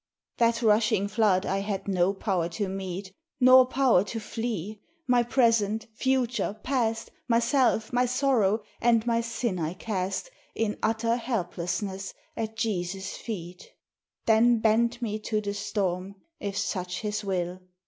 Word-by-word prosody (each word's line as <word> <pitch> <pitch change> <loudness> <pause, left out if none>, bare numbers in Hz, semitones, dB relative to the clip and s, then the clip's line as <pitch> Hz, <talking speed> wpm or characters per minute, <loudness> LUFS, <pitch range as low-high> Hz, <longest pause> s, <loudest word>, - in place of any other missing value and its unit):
That 235 0 +2
rushing 215 -2 +3
flood 200 -3 +2
I 195 - 0
had 195 -1 -3
no 185 -1 +2
power 190 -4 -1
to 205 - 0
meet, 190 0 -5 0.3
Nor 255 0 +7
power 255 -8 +3
to 225 +3 -4
flee: 215 -2 -4 0.2
my 245 -3 +4
present, 230 -3 +2
future, 245 -3 0
past, 230 -4 -1 0.2
Myself, 235 0 +2
my 250 +1 +3
sorrow, 240 -5 +2 0.2
and 230 -1 +3
my 230 -1 +2
sin 230 -4 -2
I 165 +2 -2
cast 195 - -3 0.2
In 220 -2 -1
utter 230 +1 +1
helplessness 190 -3 -3 0.2
at 220 -1 -4
Jesu's 190 -3 -2
feet: 180 -5 -7 0.6
Then 230 +2 +5
bent 230 +2 +2
me 215 -1 -2
to 215 0 -1
the 205 -1 -3
storm, 195 -2 -2 0.2
if 200 -1 -4
such 180 -3 -2
his 210 0 -2
will. 180 -2 -2
215 Hz, 140 wpm, -27 LUFS, 195-235 Hz, 0.6 s, Nor